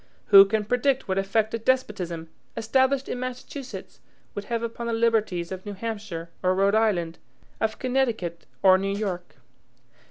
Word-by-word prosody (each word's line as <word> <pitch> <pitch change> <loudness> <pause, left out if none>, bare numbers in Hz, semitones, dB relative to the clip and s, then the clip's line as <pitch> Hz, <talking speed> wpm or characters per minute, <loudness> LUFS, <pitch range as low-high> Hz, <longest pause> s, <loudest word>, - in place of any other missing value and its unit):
Who 195 -1 +10
can 210 +1 -1
predict 255 +3 +1
what 190 0 0
effect 215 +3 0
a 230 - -1
despotism, 195 -10 -1 0.3
established 260 +4 +2
in 245 - -3
Massachusetts, 255 +1 -7 0.3
would 205 - -5
have 235 -1 -2
upon 230 0 -4
the 230 - -1
liberties 220 -7 +1
of 185 0 -6
New 205 - -6
Hampshire 200 -6 -5
or 185 0 +2
Rhode 195 +1 +3
Island, 190 -7 +1 0.4
of 220 0 -1
Connecticut 235 -10 -1 0.2
or 190 -1 +7
New 195 +1 -1
York? 185 -4 -4
215 Hz, 155 wpm, -25 LUFS, 190-235 Hz, 0.4 s, Who